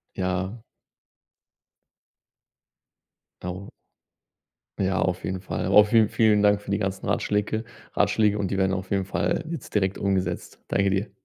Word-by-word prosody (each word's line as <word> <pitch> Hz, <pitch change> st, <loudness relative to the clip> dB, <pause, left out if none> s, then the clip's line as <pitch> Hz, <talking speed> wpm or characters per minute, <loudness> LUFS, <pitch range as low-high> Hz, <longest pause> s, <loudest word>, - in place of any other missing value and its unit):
Ja. 95 Hz, +4 st, -2 dB, 2.8 s
Dauer 90 Hz, +2 st, -6 dB, 1.1 s
Ja, 95 Hz, 0 st, 0 dB
auf 90 Hz, 0 st, -1 dB
jeden 95 Hz, -1 st, -3 dB
Fall. 90 Hz, -1 st, -3 dB
Aber 100 Hz, +3 st, +7 dB
vielen 110 Hz, 0 st, +4 dB
vielen 110 Hz, -2 st, +3 dB
Dank 105 Hz, 0 st, +4 dB
für 100 Hz, -, -7 dB
die 100 Hz, -, +2 dB
ganzen 95 Hz, -1 st, -3 dB
Ratschläke 105 Hz, +2 st, 0 dB, 0.3 s
Ratschläge 105 Hz, -1 st, +2 dB
und 95 Hz, -2 st, -1 dB
die 95 Hz, -, -1 dB
werden 95 Hz, 0 st, +2 dB
auf 95 Hz, 0 st, -4 dB
jeden 100 Hz, -1 st, +1 dB
Fall -, -, -1 dB
jetzt 165 Hz, -6 st, -7 dB
direkt 95 Hz, -2 st, +1 dB
umgesetzt. 95 Hz, -2 st, -2 dB
Danke 100 Hz, 0 st, +2 dB
dir. 95 Hz, +2 st, -1 dB
100 Hz, 140 wpm, -25 LUFS, 95-105 Hz, 2.8 s, Aber